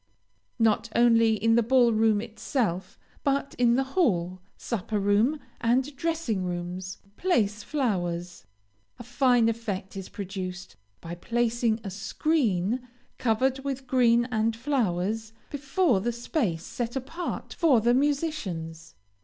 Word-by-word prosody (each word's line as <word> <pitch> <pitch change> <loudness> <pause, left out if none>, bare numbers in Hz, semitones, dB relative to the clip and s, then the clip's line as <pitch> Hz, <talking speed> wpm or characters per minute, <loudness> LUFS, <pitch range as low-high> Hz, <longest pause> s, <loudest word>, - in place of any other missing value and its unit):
Not 225 +1 +2
only 230 -1 +5
in 225 +2 +2
the 235 - +5
ball 240 0 +4
room 220 -1 +3
itself, 220 - -3 0.3
but 280 -1 0
in 240 -1 +4
the 265 - +2
hall, 185 - +1 0.2
supper 215 -2 -3
room, 210 +9 +2 0.2
and 255 +5 +1
dressing 320 - -1
rooms, 180 +1 -4 0.2
place 215 - +1
flowers. 180 - -2 0.5
A - - -9
fine 245 -1 +3
effect 215 -5 -3
is 195 -1 -6
produced, 190 - -6 0.3
by 170 - -7
placing 235 +4 0
a 195 - -5
screen, 220 - 0 0.4
covered 255 +3 +1
with 270 -1 -4
green 240 -2 +3
and 220 0 +1
flowers, 225 -4 -1 0.2
before 275 - +1
the 240 +4 0
space 230 - -2
set 240 0 -4
apart 275 +7 -5
for 300 -9 +4
the 240 +2 +3
musicians. 240 - -2
230 Hz, 125 wpm, -27 LUFS, 195-260 Hz, 0.5 s, only